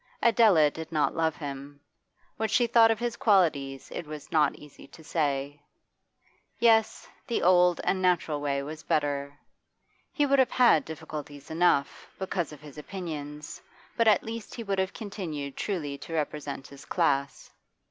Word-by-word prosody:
Adela 210 Hz, -10 st, +5 dB
did 160 Hz, +1 st, -8 dB
not 155 Hz, -2 st, +1 dB
love 160 Hz, -1 st, +1 dB
him; 140 Hz, -1 st, -7 dB, 0.6 s
what 220 Hz, 0 st, -2 dB
she 240 Hz, +3 st, +3 dB
thought 230 Hz, -1 st, +5 dB
of 225 Hz, -, +2 dB
his 235 Hz, 0 st, -2 dB
qualities 145 Hz, -, +1 dB
it 170 Hz, -, -6 dB
was 150 Hz, -1 st, -9 dB
not 155 Hz, -2 st, +3 dB
easy 150 Hz, -2 st, -14 dB
to 160 Hz, -, -15 dB
say. 145 Hz, -2 st, -2 dB, 1.0 s
Yes, 225 Hz, -2 st, +3 dB, 0.2 s
the 235 Hz, -, -1 dB
old 180 Hz, -1 st, +5 dB
and 190 Hz, -, 0 dB
natural 175 Hz, -5 st, +1 dB
way 140 Hz, -1 st, -1 dB
was 155 Hz, +2 st, -7 dB
better. 145 Hz, -1 st, -1 dB, 0.7 s
He 295 Hz, -, +1 dB
would 275 Hz, -1 st, +3 dB
have 260 Hz, -, +4 dB
had 240 Hz, -11 st, +4 dB
difficulties 150 Hz, -2 st, -8 dB
enough, 160 Hz, -4 st, +1 dB
because 185 Hz, -4 st, -3 dB
of 150 Hz, -, -12 dB
his 150 Hz, -1 st, -11 dB
opinions, 150 Hz, -4 st, -7 dB, 0.3 s
but 230 Hz, -1 st, +2 dB
at 215 Hz, -, +5 dB
least 225 Hz, -1 st, -7 dB
he 235 Hz, -, -5 dB
would 195 Hz, -2 st, -1 dB
have 190 Hz, 0 st, 0 dB
continued 165 Hz, -10 st, -6 dB
truly 150 Hz, -9 st, -3 dB
to 165 Hz, -, -7 dB
represent 150 Hz, -3 st, -3 dB
his 140 Hz, 0 st, -13 dB
class. 140 Hz, -1 st, -1 dB
160 Hz, 160 wpm, -28 LUFS, 145-200 Hz, 1.0 s, Adela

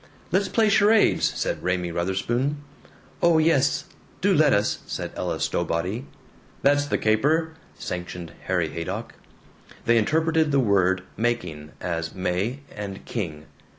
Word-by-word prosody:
"Let's 190 Hz, +2 st, +2 dB
play 225 Hz, -2 st, +3 dB
charades!" 210 Hz, +1 st, +4 dB
said -, -, -1 dB
Raymie 90 Hz, -1 st, -1 dB
Wutherspoon. 100 Hz, -, -1 dB, 0.6 s
"Oh 170 Hz, -1 st, +5 dB
yes, 155 Hz, -3 st, +3 dB, 0.3 s
do -, -, +3 dB
let -, -, +5 dB
us," -, -, +2 dB
said -, -, -4 dB
Ella -, -, -2 dB
Stowbody. 90 Hz, -, -1 dB, 0.6 s
"That's 145 Hz, +1 st, +3 dB
the -, -, +1 dB
caper," 150 Hz, +10 st, +2 dB, 0.2 s
sanctioned 90 Hz, -3 st, -6 dB
Harry 90 Hz, -4 st, 0 dB
Haydock. 85 Hz, +2 st, -5 dB, 0.7 s
They 115 Hz, 0 st, +5 dB
interpreted 160 Hz, +5 st, +2 dB
the 140 Hz, -, +3 dB
word 95 Hz, -5 st, +2 dB
"making" 80 Hz, -10 st, -2 dB
as 85 Hz, -1 st, -3 dB
May 95 Hz, +8 st, -1 dB
and 100 Hz, -2 st, -6 dB
King. 80 Hz, -9 st, -4 dB
110 Hz, 125 wpm, -25 LUFS, 90-145 Hz, 0.7 s, Oh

